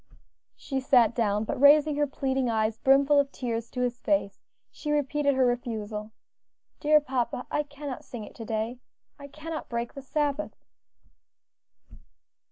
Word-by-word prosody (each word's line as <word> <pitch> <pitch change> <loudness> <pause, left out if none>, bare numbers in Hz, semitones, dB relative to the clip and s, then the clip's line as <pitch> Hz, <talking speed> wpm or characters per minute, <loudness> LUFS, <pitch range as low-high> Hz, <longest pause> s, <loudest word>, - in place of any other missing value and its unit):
She 270 -2 -3
sat 245 -4 +4
down, 210 -3 +1
but 220 - -4
raising 295 +1 +6
her 295 0 +2
pleading 265 -2 -1
eyes, 220 -1 0
brimful 280 +2 +5
of 280 -1 +1
tears 235 -2 -4
to 250 - -4
his 245 -1 -1
face, 295 -10 0 0.3
she 300 - -5
repeated 290 -1 +1
her 260 -1 +3
refusal. 220 -4 -3 0.7
"Dear 300 0 +5
papa, 255 -3 -2
I 295 - +1
cannot 285 -2 -7
sing 235 -3 -8
it - - -11
to 230 - -6
day. 225 +3 -3 0.4
I 280 - -9
cannot 310 +2 -7
break 235 0 -3
the 275 - -8
Sabbath." 290 +2 -2
265 Hz, 150 wpm, -27 LUFS, 235-290 Hz, 0.7 s, raising